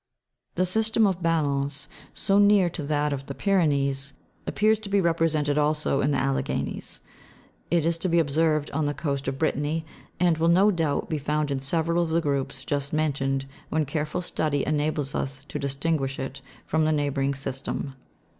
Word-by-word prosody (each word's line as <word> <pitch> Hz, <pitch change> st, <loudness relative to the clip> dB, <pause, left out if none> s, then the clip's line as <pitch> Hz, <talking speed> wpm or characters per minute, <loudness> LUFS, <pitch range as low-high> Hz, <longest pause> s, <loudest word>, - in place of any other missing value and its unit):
The 185 Hz, -, +2 dB
system 220 Hz, +4 st, +3 dB
of 190 Hz, -3 st, 0 dB
Ballons, 145 Hz, -4 st, 0 dB, 0.2 s
so 200 Hz, -1 st, +2 dB
near 200 Hz, -3 st, +5 dB
to 160 Hz, -, -5 dB
that 150 Hz, 0 st, 0 dB
of 135 Hz, -1 st, -5 dB
the 140 Hz, -, -5 dB
Pyrenees, 140 Hz, -8 st, +1 dB, 0.3 s
appears 215 Hz, +1 st, +2 dB
to 210 Hz, -, -7 dB
be 200 Hz, 0 st, +3 dB
represented 160 Hz, -4 st, +1 dB
also 150 Hz, -2 st, +1 dB
in 140 Hz, -, +2 dB
the 140 Hz, -, +1 dB
Alleghanies: 135 Hz, 0 st, -2 dB, 0.7 s
it 170 Hz, -2 st, +2 dB
is 165 Hz, 0 st, +1 dB
to 185 Hz, -, -1 dB
be 170 Hz, -, +2 dB
observed 155 Hz, -1 st, +2 dB
on 150 Hz, 0 st, 0 dB
the 145 Hz, -, -2 dB
coast 140 Hz, -4 st, -2 dB
of 135 Hz, 0 st, -2 dB
Brittany, 155 Hz, +1 st, -1 dB, 0.3 s
and 170 Hz, -2 st, +3 dB
will 165 Hz, -, +3 dB
no 190 Hz, +5 st, +5 dB
doubt 160 Hz, -6 st, 0 dB
be 155 Hz, -, -2 dB
found 150 Hz, +1 st, -1 dB
in 135 Hz, -, 0 dB
several 165 Hz, +5 st, +1 dB
of 170 Hz, -, -1 dB
the 165 Hz, +1 st, +2 dB
groups 140 Hz, -3 st, -2 dB
just 140 Hz, -1 st, -2 dB
mentioned, 135 Hz, -3 st, 0 dB, 0.2 s
when 155 Hz, -1 st, +1 dB
careful 150 Hz, +4 st, -2 dB
study 150 Hz, -5 st, -1 dB
enables 150 Hz, -2 st, 0 dB
us 135 Hz, 0 st, -3 dB
to -, -, -4 dB
distinguish 140 Hz, 0 st, -1 dB
it 135 Hz, 0 st, -5 dB, 0.2 s
from 160 Hz, 0 st, +1 dB
the 155 Hz, -, +2 dB
neighbouring 140 Hz, -2 st, 0 dB
system. 135 Hz, +1 st, -3 dB
150 Hz, 175 wpm, -26 LUFS, 140-165 Hz, 0.7 s, near